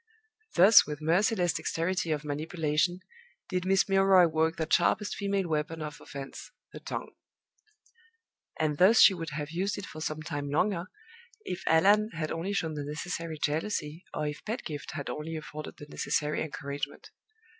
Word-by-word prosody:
Thus, 200 +5 +8
with 150 -1 -5
merciless 175 +3 +2
dexterity 170 0 -1
of 150 -1 -1
manipulation, 155 +3 -1 0.5
did 180 -1 -1
Miss 190 0 +3
Milroy 195 -2 +6
work 160 0 +1
that 160 -1 -2
sharpest 210 -1 +2
female 200 -2 -1
weapon 155 +1 -2
of 150 -1 -7
offense, 135 -1 -8 0.2
the - - -8
tongue; - - -5 1.5
and 150 -2 0
thus 205 +5 +6
she 200 - +9
would 165 -3 -5
have 150 0 -4
used 190 +4 -1
it 200 - -5
for 155 - -9
some 155 0 -3
time 145 -2 -4
longer, 175 +4 +1 0.6
if 180 +1 -4
Allan 205 +7 +5
had 160 -2 -3
only 170 +4 -3
shown 165 -6 -1
the 150 -1 -4
necessary 160 +2 -4
jealousy, 155 +1 -2
or 150 - -3
if 150 0 -5
Pedgift 210 - -5
had 145 - -5
only 160 +2 -4
afforded 155 -1 -7
the 145 - -10
necessary 150 0 -1
encouragement. 140 -1 -5
160 Hz, 155 wpm, -29 LUFS, 150-185 Hz, 1.5 s, she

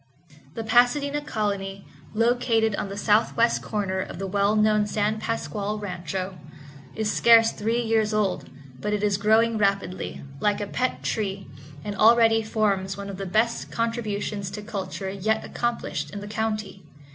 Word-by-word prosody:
The 225 - -3
Pasadena 245 +6 +3
Colony, 200 -6 -3 0.3
located 230 -1 +2
on 200 - -3
the 200 - -6
southwest 225 +3 +2
corner 195 -3 -2
of 185 - -5
the 195 - -4
well 200 +2 +1
known 215 -1 +3
San 210 +1 0
Pasqual 215 -2 -3
Rancho, 185 -1 -5 0.6
is 220 -1 0
scarce 230 -1 +6
three 225 +3 -1
years 220 -1 +1
old, 210 -3 0 0.3
but 210 +10 -2
it 210 0 -1
is 205 -2 +2
growing 220 +2 +3
rapidly, 195 -2 -1 0.2
like 205 -1 +1
a 205 - -2
pet 255 +5 -2
tree, 195 -3 -2 0.4
and 205 - -3
already 225 +1 +5
forms 200 -3 0
one 200 0 -6
of 190 - -8
the 195 0 -5
best 220 +5 0
contributions 215 -4 -2
to 210 +2 -7
culture 195 -2 -5
yet 215 +3 -1
accomplished 235 -11 -3
in 205 - -6
the 205 - -8
county. 215 -2 -3
210 Hz, 155 wpm, -25 LUFS, 200-225 Hz, 0.6 s, scarce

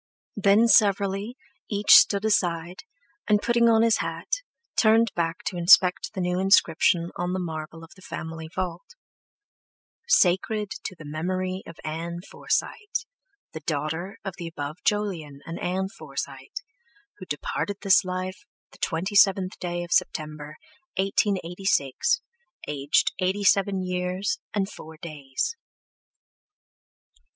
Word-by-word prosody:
Then 205 +3 +4
severally, 200 +2 +3 0.3
each 205 -1 +4
stood 200 +1 +7
aside, 180 - 0 0.4
and 210 -1 +5
putting 235 +1 +3
on 225 0 +5
his 230 -1 +4
hat, - - -3 0.3
turned 225 +1 +4
back 165 -1 -2
to 180 - -3
inspect 180 +2 +5
the 190 - -2
new 180 0 0
inscription 170 -3 +3
on 180 +1 -2
the 185 - -1
marble 165 -1 -6
of 165 - -14
the 185 - -17
family 160 -2 -7
vault: 185 - -4 1.1
SACRED 210 - +2
TO 185 - -5
THE 155 - -11
MEMORY 185 +5 -3
OF 165 - -10
ANN 170 +2 -4
FORSYTE, 450 +2 -2 0.5
THE 160 - -5
DAUGHTER 160 +6 -3
OF 195 - -3
THE 170 - -5
ABOVE 150 -1 -6
JOLYON 180 -10 -1
AND 165 - -6
ANN 190 +2 -1
FORSYTE, - - -7 0.7
WHO 185 - -8
DEPARTED 190 +7 -3
THIS 195 -1 +5
LIFE 185 0 -4 0.3
THE - - -18
27TH 190 +2 +2
DAY 175 -1 -3
OF 170 - -10
SEPTEMBER, 150 -1 -1 0.4
1886, 195 - +1 0.5
AGED 145 0 +1
EIGHTY 190 +2 0
SEVEN 195 -1 +3
YEARS 185 +4 -2 0.2
AND 195 -2 +1
FOUR 160 -5 -11
DAYS. 155 - -4
185 Hz, 125 wpm, -25 LUFS, 165-200 Hz, 1.1 s, stood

